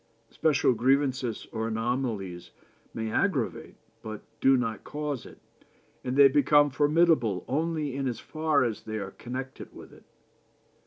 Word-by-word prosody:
Special 150 -5 +2
grievances 130 -1 +1
or 110 0 -2
anomalies 115 -6 -3 0.4
may 110 -1 -4
aggravate, - - -1 0.3
but 110 -1 -7 0.2
do 135 0 +5
not 115 -3 -2
cause 145 -4 -4
it, - - -14 0.7
and 130 +1 -2
they 140 -1 +9
become 145 +1 +4
formidable 145 - +2
only 155 -1 -1
in 135 -1 -1
as 120 - -3
far 155 -3 +1
as 115 -4 -2
they 110 0 -5
are 100 -2 -5
connected 130 +4 -7
with - - -12
it. - - -18
130 Hz, 140 wpm, -28 LUFS, 115-145 Hz, 0.7 s, they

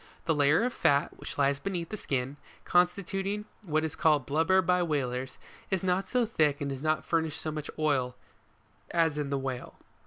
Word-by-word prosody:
The 160 - +3
layer 145 +6 +4
of 250 0 0
fat, 140 0 +2
which - - -7
lies 140 0 +2
beneath 175 0 -3
the - - -4
skin, 135 -6 -2 0.3
constituting 195 +3 +1 0.2
what 155 -6 0
is 160 -1 -3
called 150 -5 +3
blubber 165 +6 +3
by 180 +1 +3
whalers, 130 -5 -2 0.3
is 190 -2 0
not 185 +1 +1
so 250 -2 +2
thick 155 -10 +1
and 145 - -2
does 135 -1 -5
not 155 0 0
furnish 160 -2 0
so 155 - -3
much 150 -1 -5
oil, 135 -5 +1 0.7
as 165 -3 +2
in 145 -2 -2
the 140 - 0
whale. 130 -2 -4
155 Hz, 185 wpm, -29 LUFS, 140-180 Hz, 0.7 s, layer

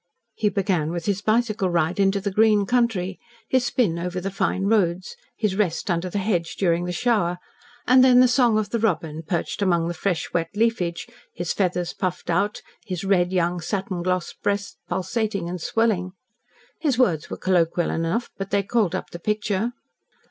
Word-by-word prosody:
He 215 -1 +1
began 190 -6 0
with 170 0 -4
his 200 -1 0
bicycle 215 -3 +1
ride 170 +1 0
into 195 0 +3
the 200 +1 -3
green 210 0 +4
country, 200 -6 0 0.3
his 255 -1 +2
spin 200 -10 +1
over 180 +1 -3
the 195 +2 -4
fine 190 0 -1
roads, 190 - +1 0.2
his 210 -4 0
rest 190 -2 0
under 175 +1 -1
the 205 - -3
hedge 185 -4 -1
during 175 -2 +1
the 180 - -3
shower, 190 -4 +1 0.5
and 255 +1 +6
then 250 -1 +7
the 255 - +7
song 245 -3 +3
of 210 -1 -1
the 235 - 0
robin 160 -7 -1
perched 170 +4 -3
among 170 -4 +2
the 175 - -2
fresh 175 0 -2
wet 165 -1 0
leafage, 205 -6 0 0.3
his 175 -1 -2
feathers 180 -3 -1
puffed 180 -1 -3
out, 200 +5 0 0.2
his 185 -5 -5
red 185 -2 +2
young 175 -1 +1
satin 190 0 -3
glossed 180 0 -2
breast 200 -1 -2
pulsating 200 0 -1
and 175 0 -5
swelling. 195 -3 0 0.7
His 280 -7 +1
words 180 - +2
were - - -5
colloquial 175 -2 +1
enough, 165 +9 -1
but 195 0 -4
they 200 0 +1
called 205 -3 +1
up - - -5
the 170 - -7
picture. 210 +3 -1
190 Hz, 180 wpm, -23 LUFS, 175-215 Hz, 0.7 s, then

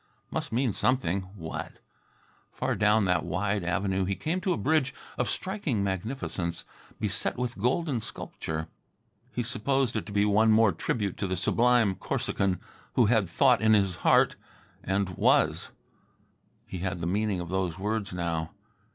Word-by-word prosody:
Must - - -3
mean 120 -1 +1
something. 100 -8 +1
What? 80 -5 -6 0.8
Far - - -1
down 105 0 +3
that 90 -3 +2
wide 100 +3 -1
avenue 95 +2 0
he 100 +1 -1
came 170 - -2
to 185 - 0
a 175 - +1
bridge 145 -4 +1 0.2
of 125 -4 -1
striking 160 - -1
magnificence, 95 -3 -3 0.3
beset - - -1
with 125 0 -2
golden 130 - +1
sculpture. 80 -6 -5 0.6
He 120 +2 -2
supposed 125 +1 0
it 110 - -2
to - - -7
be 100 0 +2
one 110 +2 +4
more 110 -1 +5
tribute 100 +3 -2
to 100 - -2
the 95 0 -1
sublime 120 +2 +3
Corsican 95 0 -1 0.3
who 125 - +4
had 105 -6 +2
thought 125 +7 +4
in 110 0 +5
his 100 -3 +1
heart, - - +4 0.5
and 95 0 0
was. - - +3 1.0
He 95 - -6
had 95 0 -2
the 85 - -3
meaning 100 +1 0
of 85 -1 -5
those 95 -2 -1
words 105 +1 -2
now. 85 -3 -2
105 Hz, 155 wpm, -28 LUFS, 95-120 Hz, 1.0 s, more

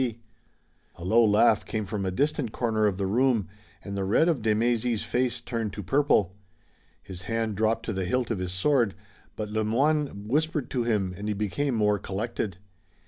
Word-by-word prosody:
A 85 - -9
low 115 +5 +5
laugh 105 0 +4
came 110 -2 -3
from 100 0 -3
a - - +1
distant 140 - 0
corner 110 -3 +1
of 95 -3 -1
the 100 - -1
room, 115 +1 +2 0.4
and 100 - -6
the 100 - -1
red 105 - +3
of 160 -8 0
de 110 -1 +2
Mézy's 115 0 +1
face 125 0 -1
turned 115 -4 -3
to 105 - -6
purple. 105 - +2 0.7
His 90 -2 -9
hand 115 -2 -1
dropped 110 +2 0
to 110 - -2
the 95 -1 -2
hilt 120 +5 0
of 110 - -1
his 90 -1 -3
sword, 110 +2 +2 0.4
but 105 -1 -4
Le 110 +1 0
Moyne 135 -1 0
whispered 150 +2 0
to 125 - 0
him 105 -6 0
and 100 +3 -6
he 105 - -1
became 120 +7 -1
more 105 -2 +2
collected. 100 -1 -3
110 Hz, 190 wpm, -27 LUFS, 100-120 Hz, 0.7 s, low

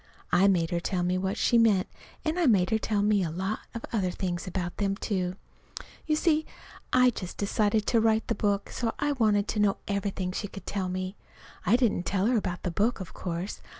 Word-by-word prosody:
I 185 +3 +5
made 170 -4 +2
her 175 - +1
tell 180 +1 -1
me 180 +1 +1
what 190 +1 -2
she 235 - +4
meant, 210 -5 +4 0.4
and 320 +3 0
I 340 - +3
made 195 -5 +4
her 220 - +3
tell 210 -2 0
me 210 -1 +3
a 170 - -1
lot 190 +6 -2 0.2
of 230 - -4
other 195 -5 +1
things 180 0 -3
about 175 -1 -3
them, 195 -1 0
too. 185 -4 -2 0.7
You 305 - +3
see, 315 -1 +2 0.5
I'd 250 -1 +4
just 180 -2 -6
decided 210 +1 +1
to 230 +1 +3
write 220 0 +2
the - - +1
book, 200 -1 -1
so 230 -2 -2
I 290 0 0
wanted 215 -6 +2
to 215 - -1
know 205 -1 +3
everything 200 -2 -2
she 205 - -3
could 195 - -10
tell 190 -2 -2
me. 185 +2 -4 0.5
I 210 - +6
didn't 230 -8 +1
tell 195 0 +1
her 240 +1 +3
about 180 -4 -3
the 180 - -1
book, 220 +8 +1
of 185 - -7
course. 175 +2 -4
200 Hz, 215 wpm, -28 LUFS, 185-220 Hz, 0.7 s, I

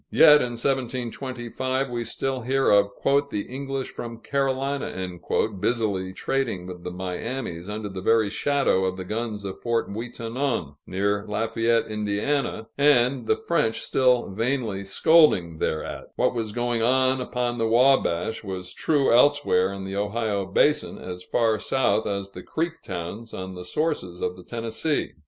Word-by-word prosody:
Yet 150 0 +7
in 120 -1 -2
1725 130 +1 -2
we 120 -1 -2
still 135 +1 -2
hear 135 +3 +2
of 100 -1 +5 0.4
"the 105 -6 -2
English 135 0 -4
from 115 -1 -7
Carolina" 135 -6 -1 0.5
busily 100 -5 0
trading 100 -1 -2
with 90 -1 -8
the - - -4
Miamis 90 +1 -4
under 105 0 -4
the 95 -2 -6
very 110 0 +3
shadow 140 -8 +2
of 95 0 -2
the 95 - -4
guns 105 0 -3
of 95 - -5
Fort 115 -1 0
Ouiatanon 115 - -3
(near 100 +2 0
Lafayette, 115 +2 +1
Ind.), 105 -1 -3 0.7
and 130 -4 +4
the - - +4
French 150 -10 +1
still 125 -5 +2
vainly 115 -2 -1
scolding 100 - +4
thereat. 80 - -2
What - - +2
was 115 -3 -3
going 120 +1 0
on 130 +2 +3
upon 120 -1 -2
the 115 - +2
Wabash, 115 -5 +3
was 90 -2 -6
true 145 - +2
elsewhere 125 -8 +4
in 100 -1 -6
the 95 +1 -4
Ohio 105 -1 -1
basin, 150 +10 +2
as 90 0 -7
far 110 -3 +1
south 110 -3 +1
as 100 -1 -3
the - - -9
Creek 165 +1 -3
towns 95 +5 -6
on 95 0 -6
the 90 0 -7
sources 95 - -2
of 90 - -1
the 90 - -12
Tennessee. 115 - -2
115 Hz, 150 wpm, -25 LUFS, 100-130 Hz, 0.7 s, Yet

